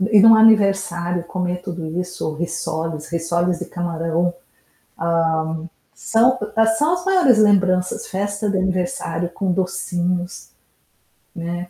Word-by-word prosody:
E 210 +2 +4
e - - +8
no 225 +2 +8
aniversário 195 -6 +3
comer 180 0 -3
tudo 175 -4 -6
isso, 180 -3 -5
risoles, 160 -1 -4
risoles 170 +1 -1
de 180 - -5
camarão, 170 0 -2
hã, 175 - -6 1.6
são 245 +3 +2 0.4
são 310 +4 +2
as 355 0 -5
maiores 365 - +4
lembranças, 185 -4 +2
festa 205 +2 -3
de 200 - 0
aniversário 180 -2 -2
com 190 +2 -2
docinhos, 180 -1 -3 0.9
né. 175 +1 -5
180 Hz, 120 wpm, -20 LUFS, 175-200 Hz, 1.6 s, e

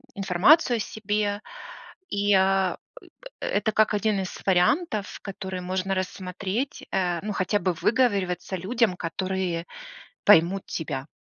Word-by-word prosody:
информацию 200 - +4
о - - -4
себе. 210 0 -2 0.7
И 205 0 +1
э 190 -1 +3 0.7
э - - -3
это 210 +2 0
как 215 0 +3
1 210 -1 +1
из 185 - -6
вариантов, 200 - +1
которые 190 -2 -6
можно 185 +1 -2
рассмотреть, 190 +6 -4
э, 180 -3 0
ну, 210 +1 -4
хотя 200 +2 0
бы 185 -3 0
выговариваться 195 -3 0
людям, 205 +2 0
которые 180 0 -3 0.6
поймут 190 0 +5
тебя. 145 -4 -4
195 Hz, 125 wpm, -25 LUFS, 185-210 Hz, 0.7 s, поймут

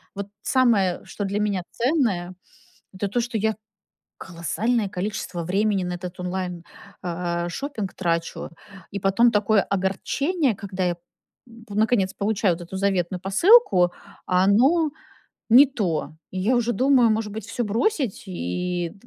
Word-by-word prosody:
Вот, 200 0 -5
самое, 225 -9 +2
что 205 - -5
для 200 +1 -2
меня 205 -3 0
ценное, 230 - 0 0.6
это 190 +2 -2
то, 240 +5 0
что 235 -1 -3
я 220 +1 0 0.6
колоссальное 205 +6 -1
количество 185 -2 -4
времени 195 +2 +1
на 180 0 -3
этот 180 +1 -7
онлайн, 180 -1 -4 0.4
э, 175 -1 -2
шопинг, 220 -1 -5
трачу. 170 -2 -2 0.4
И 200 - -4
потом 195 +6 +4
такое 210 -1 +3
огорчение, 245 - 0
когда 190 -2 -4
я 175 -1 +1
п 225 +5 -17
наконец, 210 -3 +2
получаю 200 -3 +1
вот 175 - -10
эту - - -3
заветную 190 -2 0
посылку, 195 - +5 0.4
а 180 0 +3
оно 275 - +4 0.6
не 260 +6 +9
то. 185 - -2 0.2
Я 190 +7 0
уже 240 0 +1
думаю, 255 -2 +4
может 215 -1 -1
быть 215 -1 -6
всё 235 +2 -3
бросить, 240 - -1
и 175 - -3
200 Hz, 140 wpm, -24 LUFS, 180-230 Hz, 0.6 s, не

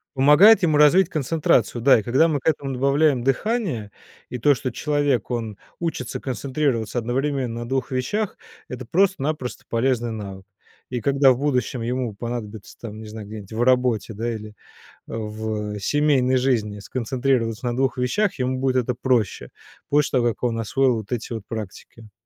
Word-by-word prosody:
Помогает 150 +12 +7
ему 155 -4 +3
развить 165 +5 +5
концентрацию, 150 -6 +1
да, 130 -1 +6
и - - -6
когда 130 +9 +3
мы 150 -3 0
к - - -7
этому 140 -3 0
добавляем 140 0 +2
дыхание, 135 - -1 0.4
и 125 - -4
то, 145 +4 +4
что 130 +1 -4
человек, 145 -3 0
он 115 -4 -3 0.2
учится 160 -8 -3
концентрироваться 130 -3 -2
одновременно 125 0 -1
на 120 - -6
2 135 0 -1
вещах, 185 - -2 0.3
это 125 -1 -7
просто-напросто 155 - 0
полезный 120 -1 0
навык. 100 -3 -7 0.4
И 120 -2 -3
когда 140 +1 +4
в 125 - +1
будущем 130 -3 -1
ему 120 -2 -2
понадобится 110 -2 -6
там, 110 -2 -8
не 110 - -9
знаю, 105 -1 -8
где-нибудь 105 -1 -9
в 115 - -2
работе, 125 -3 +2
да, 115 +3 -2
или 105 -1 -8 0.5
в, 110 -1 -4
э, - - -5
семейной 135 0 +2
жизни 115 -5 0
сконцентрироваться 125 0 -1
на 120 -1 -1
2 135 +1 0
вещах, 125 +12 0
ему 130 0 -1
будет 130 -1 0
это 125 -1 +1
проще, 120 - 0 0.4
после 145 -2 +2
того, 120 - +2
как 115 - -7
он 115 -2 0
освоил 130 +4 +2
вот 110 0 -8
эти 120 -1 -3
вот 110 - -4
практики. 110 0 -8
125 Hz, 165 wpm, -23 LUFS, 115-140 Hz, 0.5 s, Помогает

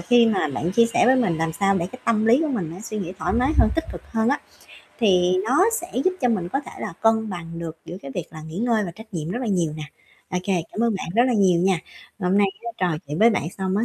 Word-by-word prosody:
khi 240 +6 +5
mà 205 -8 +1
bạn 165 +6 -2
chia 230 +3 +5
sẻ 230 +1 +2
với 260 +1 +6
mình 180 -10 +1
làm 165 0 -1
sao 195 +3 +2
để 170 - -1
cái 255 - -9
tâm 220 -1 +2
lý 240 +6 +5
của 320 - 0
mình 195 - -2
nó 185 - -9
suy 215 0 -5
nghĩ 180 -2 -4
thoải - - -1
mái 255 +5 +2
hơn, - - +6
tích 325 - 0
cực - - -8
hơn 225 0 +1
á, 280 - +1 0.6
thì 185 -5 +3
nó 275 - +4 0.2
sẽ 350 - -10
giúp 370 - +3
cho 250 - +2
mình 190 -7 0
có 275 - -1
thể 285 - -11
là - - -4
cân 220 -1 +2
bằng 170 -2 -6
được 165 -1 -6
giữa 175 - -7
cái 140 - -7
việc 175 - -3
là 155 -2 -10
nghỉ 160 +3 -7
ngơi 225 -2 +1
và 175 - -4
trách 220 +4 -14
nhiệm 160 -1 -3
rất 225 - -2
là - - -2
nhiều 175 -7 0
nè. 155 - -6 0.5
Ô 180 - 0
kê, 185 -4 +1
cảm - - -4
ơn 230 -2 +2
bạn - - -5
rất 235 - +5
là 255 - +2
nhiều 190 -6 +3
nha. 185 -1 +2 0.4
Hôm 185 +1 +1
nay 205 - +5 0.2
á, 235 - -3
trò 175 -4 0
chuyện 150 +4 -4
với 230 +2 +6
bạn 215 - 0 0.2
xong 190 0 -1
á, 220 - +2
200 Hz, 295 wpm, -23 LUFS, 175-230 Hz, 0.6 s, với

